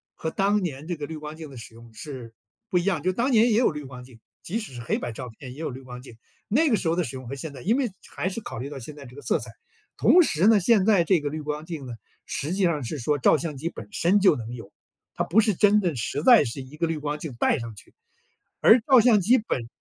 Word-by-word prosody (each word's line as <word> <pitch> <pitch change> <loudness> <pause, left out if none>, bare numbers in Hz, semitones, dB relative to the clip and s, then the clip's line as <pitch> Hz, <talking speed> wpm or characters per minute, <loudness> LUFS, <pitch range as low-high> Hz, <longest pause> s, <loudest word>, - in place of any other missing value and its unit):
和 160 - -3
当 200 +1 +1
年 150 -2 -5
这 175 - -2
个 150 -2 -5
滤 160 - -6
光 150 0 -8
镜 160 -3 -9
的 135 - -11
使 115 -1 -11
用 115 -1 -15
是 125 -3 -9 0.4
不 185 - +1
一 175 - +1
样。 185 -6 0
就 185 - +2
当 245 +7 0
年 230 +1 +5
也 215 - +3
有 235 -7 +3
滤 150 -1 -7
光 125 -1 -10
镜， 125 -3 -16 0.2
即 220 +7 -3
使 210 - -8
是 120 - -7
黑 115 - -1
白 120 - -4
照 125 +2 -7
片 125 +3 -11
也 145 - -13
有 160 - -3
滤 130 +2 -9
光 125 -1 -10
镜， 120 -3 -14 0.3
那 295 +9 +3
个 235 - +3
时 165 - -3
候 165 - +2
的 180 - +1
使 130 -1 -6
用 130 -2 -8
和 140 - -5
现 145 +3 -6
在 130 - -10
因 220 +5 +2
为 255 -6 -1 0.2
还 185 - -1
是 195 - -5
考 115 - -7
虑 135 - -5
到 145 - -8
现 145 +4 -9
在 140 -2 -11
这 125 +2 -13
个 145 - -10
色 - - 0
彩。 - - -8 0.5
同 360 - +6
时 175 - +1
呢， 220 -2 +6
现 200 0 +3
在 200 -5 +4
这 180 0 +3
个 145 - -2
滤 155 +2 -5
光 150 +1 -4
镜 160 -5 -6
呢， 125 - -7 0.3
实 150 - -3
际 195 +1 0
上 160 -6 +1
是 140 +5 -5
说 145 +5 0
照 - - +4
相 155 -4 -5
机 160 +5 -3
本 - - -10
身 195 0 +2
就 190 -5 +5
能 115 +1 -7
有， 115 -5 -10 0.4
它 - - 0
不 215 +6 +4
是 215 -1 +2
真 210 +1 +4
的 175 -4 0
实 140 +4 -3
在 240 +1 +7
是 120 +3 -4
一 135 +4 -12
个 165 - 0
滤 165 - -2
光 150 +1 -3
镜 150 -4 -6
戴 - - +2
上 115 -2 -7
去。 - - -13 0.7
而 225 - +7
照 260 0 +6
相 225 -3 +5
机 240 +8 +4
本 130 - -3
155 Hz, 310 characters per minute, -25 LUFS, 130-200 Hz, 0.7 s, 在